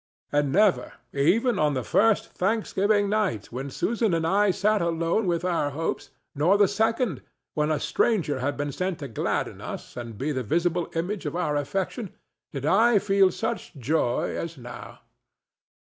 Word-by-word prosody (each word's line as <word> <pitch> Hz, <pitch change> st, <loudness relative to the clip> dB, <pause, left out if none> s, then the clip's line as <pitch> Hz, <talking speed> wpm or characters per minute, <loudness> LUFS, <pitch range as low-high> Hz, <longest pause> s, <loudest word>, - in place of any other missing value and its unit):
And 145 Hz, -1 st, +1 dB
never, 200 Hz, +3 st, +3 dB, 0.2 s
even 195 Hz, -, +2 dB
on 150 Hz, -2 st, +2 dB
the 130 Hz, -, -1 dB
first 220 Hz, -, +2 dB
Thanksgiving 205 Hz, 0 st, +1 dB
night, 200 Hz, -, -1 dB
when 130 Hz, +3 st, -5 dB
Susan 220 Hz, -, 0 dB
and 165 Hz, -1 st, 0 dB
I 200 Hz, +4 st, +3 dB
sat 210 Hz, +2 st, +2 dB
alone 170 Hz, +4 st, 0 dB
with 175 Hz, 0 st, 0 dB
our 170 Hz, -5 st, +1 dB
hopes, 155 Hz, +3 st, -3 dB, 0.2 s
nor 165 Hz, +8 st, +3 dB
the 205 Hz, -1 st, +5 dB
second, 220 Hz, -, 0 dB, 0.3 s
when 150 Hz, 0 st, 0 dB
a 155 Hz, -2 st, +1 dB
stranger 160 Hz, -, +1 dB
had 140 Hz, +3 st, -2 dB
been 145 Hz, 0 st, -2 dB
sent 185 Hz, +4 st, -2 dB
to 145 Hz, -, -6 dB
gladden 115 Hz, -, -2 dB
us -, -, -7 dB
and 115 Hz, -3 st, -7 dB
be 145 Hz, +6 st, -2 dB
the 130 Hz, -3 st, -1 dB
visible 170 Hz, +7 st, 0 dB
image 180 Hz, +1 st, -2 dB
of 150 Hz, -, -4 dB
our 160 Hz, -4 st, 0 dB
affection, 190 Hz, -, -3 dB, 0.4 s
did 135 Hz, -2 st, -5 dB
I 220 Hz, +7 st, +5 dB
feel 195 Hz, -1 st, +4 dB
such 225 Hz, -1 st, -4 dB
joy 130 Hz, -2 st, 0 dB
as 165 Hz, -2 st, -5 dB
now. 125 Hz, -1 st, -10 dB
170 Hz, 165 wpm, -26 LUFS, 145-205 Hz, 0.4 s, the